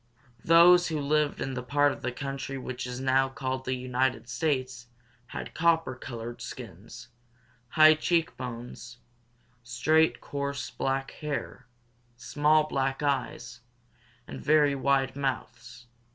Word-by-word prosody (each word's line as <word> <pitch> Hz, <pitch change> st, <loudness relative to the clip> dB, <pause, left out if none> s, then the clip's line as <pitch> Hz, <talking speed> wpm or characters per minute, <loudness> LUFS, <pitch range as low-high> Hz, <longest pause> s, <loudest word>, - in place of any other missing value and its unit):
Those 175 Hz, +2 st, +6 dB
who 155 Hz, -2 st, -2 dB
lived 150 Hz, +1 st, 0 dB
in 135 Hz, -, -3 dB
the 125 Hz, -, -3 dB
part 145 Hz, +3 st, +2 dB
of -, -, -8 dB
the 130 Hz, -, -2 dB
country 135 Hz, +1 st, -5 dB
which 130 Hz, -1 st, -5 dB
is 125 Hz, 0 st, -5 dB
now 135 Hz, 0 st, +2 dB
called 130 Hz, -1 st, -4 dB
the 130 Hz, -, -1 dB
United 125 Hz, -1 st, -1 dB
States 130 Hz, -2 st, -2 dB, 0.4 s
had -, -, -7 dB
copper 165 Hz, -4 st, +2 dB
colored 120 Hz, -2 st, -8 dB
skins, 115 Hz, +2 st, -10 dB, 0.6 s
high 155 Hz, 0 st, +7 dB
cheek 165 Hz, +1 st, 0 dB
bones, 125 Hz, 0 st, -8 dB, 0.6 s
straight, 150 Hz, +7 st, +2 dB
coarse 140 Hz, 0 st, -4 dB
black 135 Hz, 0 st, -2 dB
hair, 140 Hz, -4 st, -5 dB, 0.5 s
small 150 Hz, +5 st, +2 dB
black 135 Hz, -1 st, -2 dB
eyes, 125 Hz, -4 st, -2 dB, 0.7 s
and 70 Hz, -2 st, -8 dB
very 150 Hz, -1 st, +4 dB
wide 135 Hz, -1 st, +1 dB
mouths. 125 Hz, -2 st, -5 dB
135 Hz, 125 wpm, -28 LUFS, 125-145 Hz, 0.7 s, high